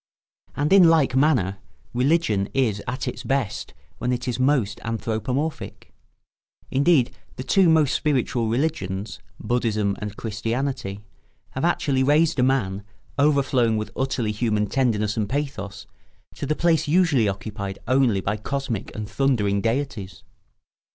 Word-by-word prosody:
And 150 Hz, +5 st, +1 dB
in 185 Hz, -4 st, +8 dB
like 150 Hz, -6 st, +3 dB
manner, 125 Hz, -, +2 dB, 0.3 s
religion 125 Hz, -6 st, +1 dB
is 110 Hz, -7 st, +1 dB
at 130 Hz, +2 st, -3 dB
its -, -, -4 dB
best 135 Hz, -6 st, -2 dB, 0.2 s
when 125 Hz, -, -1 dB
it 125 Hz, 0 st, -2 dB
is 125 Hz, 0 st, -2 dB
most 130 Hz, -6 st, +1 dB
anthropomorphic; 115 Hz, +6 st, -3 dB, 0.8 s
indeed, 140 Hz, -2 st, +3 dB, 0.2 s
the 130 Hz, -, -5 dB
two 185 Hz, +5 st, +4 dB
most 155 Hz, -4 st, +4 dB
spiritual 125 Hz, -5 st, 0 dB
religions, 110 Hz, -, -2 dB, 0.2 s
Buddhism 110 Hz, -4 st, 0 dB
and 105 Hz, 0 st, -5 dB
Christianity, 115 Hz, -1 st, -3 dB, 0.5 s
have 130 Hz, -, -4 dB
actually 145 Hz, -6 st, +1 dB
raised 150 Hz, +2 st, +3 dB
a -, -, +4 dB
man, 115 Hz, -7 st, +1 dB, 0.4 s
overflowing 135 Hz, -6 st, +3 dB
with 105 Hz, -1 st, -4 dB
utterly 130 Hz, -4 st, -1 dB
human 105 Hz, -1 st, 0 dB
tenderness 105 Hz, -3 st, 0 dB
and 105 Hz, -2 st, -1 dB
pathos, 120 Hz, -8 st, -4 dB, 0.5 s
to 140 Hz, -, -5 dB
the 155 Hz, -, +1 dB
place 160 Hz, -2 st, +2 dB
usually 150 Hz, -, +3 dB
occupied 100 Hz, 0 st, -5 dB
only 125 Hz, -6 st, +3 dB
by 105 Hz, +3 st, -1 dB
cosmic 120 Hz, -1 st, -4 dB
and 105 Hz, -1 st, -4 dB
thundering 110 Hz, -5 st, +1 dB
deities. 115 Hz, -5 st, -3 dB
125 Hz, 130 wpm, -23 LUFS, 105-140 Hz, 0.8 s, in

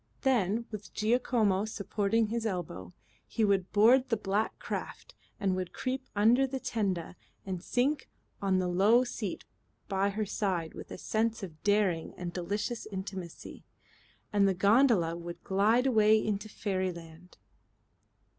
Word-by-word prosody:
Then, 230 Hz, -4 st, +1 dB
with 210 Hz, -1 st, -8 dB
Giacomo 215 Hz, -3 st, +2 dB
supporting 215 Hz, +1 st, 0 dB
his 230 Hz, 0 st, -2 dB
elbow, 165 Hz, -, -4 dB, 0.4 s
he 225 Hz, -, +1 dB
would 195 Hz, -3 st, +1 dB
board 245 Hz, +5 st, +5 dB
the 230 Hz, -, +1 dB
black 205 Hz, +2 st, -1 dB
craft -, -, -6 dB, 0.3 s
and 190 Hz, -2 st, +1 dB
would 185 Hz, -1 st, -4 dB
creep 260 Hz, 0 st, -3 dB
under 235 Hz, +6 st, +4 dB
the 265 Hz, 0 st, -4 dB
tenda 190 Hz, -9 st, -2 dB, 0.3 s
and 185 Hz, -3 st, -4 dB
sink 265 Hz, +8 st, 0 dB, 0.3 s
on 195 Hz, -1 st, +2 dB
the 185 Hz, -1 st, 0 dB
low 200 Hz, +7 st, +4 dB
seat 215 Hz, -6 st, -5 dB, 0.4 s
by 195 Hz, +1 st, +1 dB
her 210 Hz, +2 st, -2 dB
side 185 Hz, -5 st, -2 dB
with -, -, -9 dB
a -, -, -7 dB
sense 225 Hz, +3 st, -1 dB
of 160 Hz, -5 st, -8 dB
daring 205 Hz, -6 st, +1 dB
and 175 Hz, -1 st, -5 dB
delicious 205 Hz, +6 st, -3 dB
intimacy, 190 Hz, -3 st, -7 dB, 0.7 s
and 200 Hz, -1 st, +4 dB
the 190 Hz, -, +1 dB
gondola 200 Hz, -4 st, +4 dB
would 170 Hz, 0 st, -8 dB
glide 215 Hz, +6 st, +3 dB
away 220 Hz, -4 st, +5 dB
into 215 Hz, 0 st, -2 dB
fairyland. 180 Hz, -4 st, -4 dB
205 Hz, 140 wpm, -30 LUFS, 185-225 Hz, 0.7 s, board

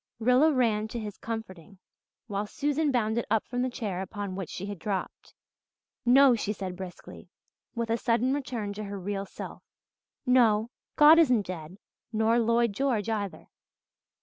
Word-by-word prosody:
Rilla 250 Hz, +7 st, +4 dB
ran 225 Hz, -6 st, +1 dB
to 235 Hz, +2 st, -5 dB
his 210 Hz, -2 st, -7 dB
comforting, 200 Hz, -5 st, -7 dB, 0.5 s
while 205 Hz, -1 st, -3 dB
Susan 295 Hz, +5 st, 0 dB
bounded 235 Hz, -3 st, +1 dB
up 220 Hz, 0 st, +1 dB
from 245 Hz, +1 st, -3 dB
the 255 Hz, -, 0 dB
chair 205 Hz, -7 st, -4 dB
upon 200 Hz, 0 st, -5 dB
which 190 Hz, -4 st, -5 dB
she 190 Hz, -, -6 dB
had 205 Hz, -3 st, -6 dB
dropped. 195 Hz, +1 st, -5 dB, 0.7 s
"No," 265 Hz, +1 st, +7 dB
she 210 Hz, -2 st, -1 dB
said 190 Hz, -3 st, -5 dB
briskly, 185 Hz, -1 st, -10 dB, 0.5 s
with 230 Hz, -1 st, -2 dB
a 230 Hz, -, +2 dB
sudden 240 Hz, +2 st, +1 dB
return 245 Hz, -7 st, -3 dB
of 200 Hz, -, -9 dB
her 200 Hz, 0 st, -5 dB
real 195 Hz, +1 st, -4 dB
self. -, -, -9 dB, 0.6 s
"No, 235 Hz, -3 st, +3 dB, 0.2 s
God 305 Hz, +2 st, +8 dB
isn't 250 Hz, -10 st, +4 dB
dead 175 Hz, 0 st, -7 dB, 0.3 s
nor 225 Hz, +1 st, +2 dB
Lloyd 235 Hz, -1 st, +2 dB
George 230 Hz, -3 st, 0 dB
either. 205 Hz, -3 st, -4 dB
220 Hz, 155 wpm, -28 LUFS, 200-245 Hz, 0.7 s, God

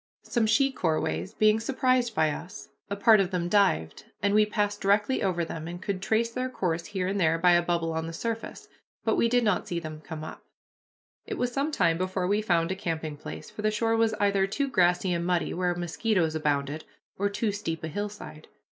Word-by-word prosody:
Some 235 Hz, -3 st, 0 dB
she 270 Hz, +5 st, +3 dB
corways 155 Hz, -, -1 dB
being 215 Hz, 0 st, +4 dB
surprised 255 Hz, -1 st, +1 dB
by 155 Hz, -1 st, +3 dB
us, 175 Hz, +5 st, -8 dB, 0.2 s
a 200 Hz, -, -2 dB
part 215 Hz, +1 st, +6 dB
of 190 Hz, -2 st, +1 dB
them 180 Hz, -2 st, -1 dB
dived, 80 Hz, -, +1 dB
and 200 Hz, 0 st, +1 dB
we 210 Hz, 0 st, +5 dB
passed 205 Hz, -1 st, -1 dB
directly 205 Hz, +6 st, +2 dB
over 175 Hz, -3 st, 0 dB
them, 160 Hz, -1 st, -6 dB
and 175 Hz, +1 st, -6 dB
could 190 Hz, -1 st, -3 dB
trace 220 Hz, +3 st, +1 dB
their 255 Hz, +2 st, -2 dB
course 170 Hz, -8 st, -2 dB
here 190 Hz, -3 st, -2 dB
and 200 Hz, +1 st, -1 dB
there 160 Hz, -1 st, +3 dB
by 180 Hz, +2 st, +4 dB
a 175 Hz, 0 st, +5 dB
bubble 170 Hz, -1 st, -1 dB
on 160 Hz, 0 st, -2 dB
the -, -, -5 dB
surface, 230 Hz, +6 st, -5 dB, 0.4 s
but -, -, +2 dB
we 230 Hz, -, +2 dB
did 245 Hz, 0 st, +3 dB
not 210 Hz, -4 st, +1 dB
see 175 Hz, -, -2 dB
them 155 Hz, -2 st, -8 dB
come 155 Hz, -1 st, -7 dB
up. 155 Hz, -, -9 dB, 0.8 s
It -, -, -4 dB
was 245 Hz, 0 st, -1 dB
some 280 Hz, +5 st, -1 dB
time 165 Hz, -, +2 dB
before 185 Hz, 0 st, -1 dB
we 205 Hz, +3 st, +1 dB
found 170 Hz, -4 st, +1 dB
a -, -, -1 dB
camping 160 Hz, -4 st, -3 dB
place, 145 Hz, -, -9 dB
for -, -, -7 dB
the 215 Hz, -, +2 dB
shore 225 Hz, +1 st, +1 dB
was 225 Hz, -1 st, +2 dB
either 200 Hz, -2 st, +2 dB
too 275 Hz, +8 st, -1 dB
grassy 180 Hz, -4 st, +2 dB
and 170 Hz, 0 st, -1 dB
muddy, 175 Hz, -1 st, 0 dB
where 180 Hz, 0 st, 0 dB
mosquitoes 175 Hz, 0 st, 0 dB
abounded, 150 Hz, -1 st, -1 dB, 0.4 s
or 200 Hz, +1 st, +1 dB
too 205 Hz, +1 st, -1 dB
steep 165 Hz, -6 st, -4 dB
a -, -, -2 dB
hillside. 205 Hz, -3 st, -6 dB
190 Hz, 215 wpm, -27 LUFS, 165-215 Hz, 0.8 s, part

